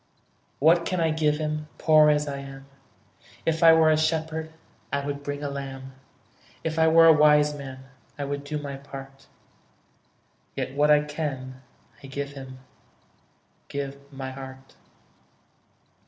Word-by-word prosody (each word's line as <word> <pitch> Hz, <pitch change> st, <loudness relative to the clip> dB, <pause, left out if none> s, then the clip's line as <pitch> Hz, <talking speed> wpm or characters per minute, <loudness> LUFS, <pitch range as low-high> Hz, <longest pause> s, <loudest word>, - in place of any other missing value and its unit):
What 165 Hz, +4 st, +4 dB
can 185 Hz, +1 st, -2 dB
I 165 Hz, -1 st, +2 dB
give 155 Hz, -1 st, +1 dB
Him, 155 Hz, 0 st, -3 dB
Poor 155 Hz, -1 st, +5 dB
as 150 Hz, 0 st, +2 dB
I 140 Hz, -1 st, -4 dB
am? 135 Hz, 0 st, -10 dB, 0.8 s
If 160 Hz, 0 st, 0 dB
I 165 Hz, -1 st, +9 dB
were 160 Hz, -1 st, +5 dB
a 155 Hz, -, +3 dB
shepherd, 160 Hz, 0 st, -1 dB, 0.4 s
I 140 Hz, 0 st, -1 dB
would 145 Hz, 0 st, -4 dB
bring 145 Hz, 0 st, -5 dB
a -, -, -1 dB
lamb; 135 Hz, -1 st, -7 dB, 0.7 s
If 160 Hz, 0 st, -2 dB
I 160 Hz, -, +5 dB
were 165 Hz, +1 st, +7 dB
a 165 Hz, -, +9 dB
wise 150 Hz, -1 st, +5 dB
man, 135 Hz, -2 st, -8 dB, 0.4 s
I 145 Hz, -, -3 dB
would 140 Hz, 0 st, -4 dB
do 150 Hz, +1 st, -4 dB
my 140 Hz, -2 st, -6 dB
part: 135 Hz, 0 st, -11 dB, 1.3 s
Yet 130 Hz, -, -3 dB
what 145 Hz, +2 st, +2 dB
I 150 Hz, 0 st, +5 dB
can 135 Hz, -4 st, -5 dB, 0.4 s
I 135 Hz, -, -10 dB
give 140 Hz, +1 st, -5 dB
Him, 135 Hz, -2 st, -10 dB, 1.1 s
Give 140 Hz, -1 st, -4 dB, 0.2 s
my 135 Hz, -1 st, -6 dB
heart. 130 Hz, 0 st, -10 dB
145 Hz, 150 wpm, -25 LUFS, 135-155 Hz, 1.3 s, I